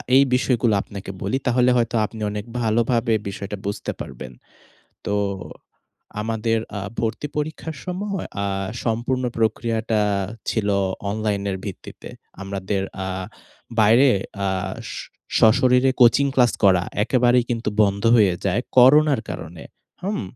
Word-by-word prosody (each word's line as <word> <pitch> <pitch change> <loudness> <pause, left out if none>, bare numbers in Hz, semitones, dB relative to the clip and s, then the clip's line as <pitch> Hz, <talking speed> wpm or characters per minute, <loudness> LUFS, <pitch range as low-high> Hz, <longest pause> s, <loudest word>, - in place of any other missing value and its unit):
এই 135 - +7
বিষয়গুলো 125 -3 +2
আপনাকে 100 -1 -8
বলি 105 +7 0
তাহলে 125 0 +3
হয়তো 120 0 0
আপনি 110 +1 -9
অনেক 105 0 -5 0.2
ভালোভাবে 115 +1 +1
বিষয়টা 100 +1 -5
বুঝতে 100 0 -3
পারবেন। 65 - -8 0.7
তো, 100 - -1 1.1
আমাদের 115 0 0 0.2
আ - - -2 0.2
ভর্তি 115 +6 -2
পরীক্ষার 155 0 -4
সময় 195 +1 -3 0.2
আ - - 0 0.4
সম্পূর্ণ 120 +3 -1
প্রক্রিয়াটা 110 0 0 0.5
ছিল 110 -3 -1 0.4
অনলাইনের 100 -2 -1
ভিত্তিতে। 95 - -8 0.3
আমাদের 95 0 -3 0.2
আ - - -4 0.7
বাইরে 115 +6 +6 0.4
আ - - +1 0.9
সশরীরে 125 +3 +5
কোচিং 125 +4 +6
ক্লাস 125 -3 +4
করা 90 -2 +5 0.2
একেবারেই 125 0 +3 0.4
বন্ধ 100 -1 +1
হয়ে 100 -5 +4
যায় 100 +5 +1 0.2
করোনার 140 0 +6
কারণে। 80 +1 -7 0.4
হুম? 200 - -2
115 Hz, 115 wpm, -22 LUFS, 100-125 Hz, 1.1 s, এই